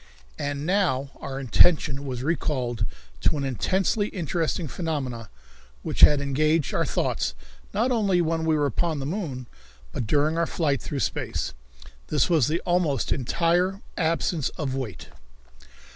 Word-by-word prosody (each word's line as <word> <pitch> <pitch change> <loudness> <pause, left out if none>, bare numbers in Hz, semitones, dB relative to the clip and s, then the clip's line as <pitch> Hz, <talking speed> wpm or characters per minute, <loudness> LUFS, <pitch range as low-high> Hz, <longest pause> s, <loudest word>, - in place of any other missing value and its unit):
And 145 0 -2
now 160 -8 +1
our 135 -1 -5
attention 140 +2 +3
was 125 -1 -4
recalled 130 -7 -1 0.3
to - - +2
an 140 - -2
intensely 190 - +1
interesting 170 -2 -2
phenomenon 135 - -3 0.6
which - - -4
had 150 -1 +8
engaged 150 +2 +1
our - - +1
thoughts - - -1 0.4
not 230 +6 +1
only 200 -6 +2
when 165 -1 0
we 160 -1 +2
were 145 - +2
upon 155 +4 0
the 135 - -3
moon, 145 -7 -3 0.5
but 115 - -3
during 150 +6 +2
our 170 - +2
flight 145 -5 0
through 140 -2 -3
space. - - -2 0.5
This 150 +3 +2
was 155 -8 +4
the 165 +3 0
almost 175 -7 +1
entire 175 - +1
absence 165 -3 0
of 140 -4 -2
weight. 115 -11 -5
150 Hz, 145 wpm, -25 LUFS, 135-170 Hz, 0.6 s, had